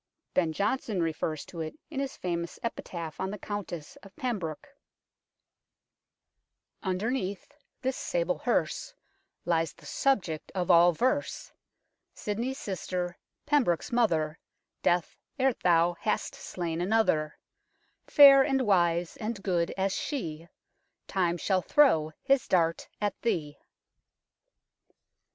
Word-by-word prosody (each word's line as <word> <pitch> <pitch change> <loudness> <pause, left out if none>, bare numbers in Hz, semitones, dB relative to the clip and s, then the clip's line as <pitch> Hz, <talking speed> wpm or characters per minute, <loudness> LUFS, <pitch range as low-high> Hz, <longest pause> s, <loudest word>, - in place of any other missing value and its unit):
Ben 170 -3 +2
Jonson 205 +1 0
refers 155 -1 -2
to 170 - -7
it 155 -1 -5
in 280 - -3
his 275 -1 -3
famous 170 -1 -3
epitaph 170 -8 -5
on 190 - -1
the 210 - -5
Countess 190 -6 -6
of 195 - -16
Pembroke 205 - -4 1.5
" - - -56
Underneath 200 0 -2 0.3
this 260 0 0
sable - - -1
herse - - -1 0.5
Lies 165 -2 +1
the - - -18
subject 185 - 0
of 180 -1 +1
all 175 +1 +7
verse, 260 - -1 0.6
Sidney's 235 +6 -3
sister 180 - -4 0.3
Pembroke's 270 - +2
mother 165 -10 +1 0.4
Death, 175 0 +1 0.2
ere 265 -1 +3
thou 175 -3 +3
hast 215 - -1
slain 170 -2 -4
another 180 -6 +1 0.7
Fair 275 -2 +9
and 270 -1 +2
wise 175 -5 +2
and 215 -2 -4
good 175 -3 +1
as 195 0 +1
she 165 - -4 0.6
Time 175 -2 0
shall 185 +2 +1
throw 165 - +4
his 275 -2 +2
dart 165 -2 +1
at 205 -2 0
thee." 150 -11 -1
185 Hz, 115 wpm, -29 LUFS, 170-235 Hz, 1.5 s, Fair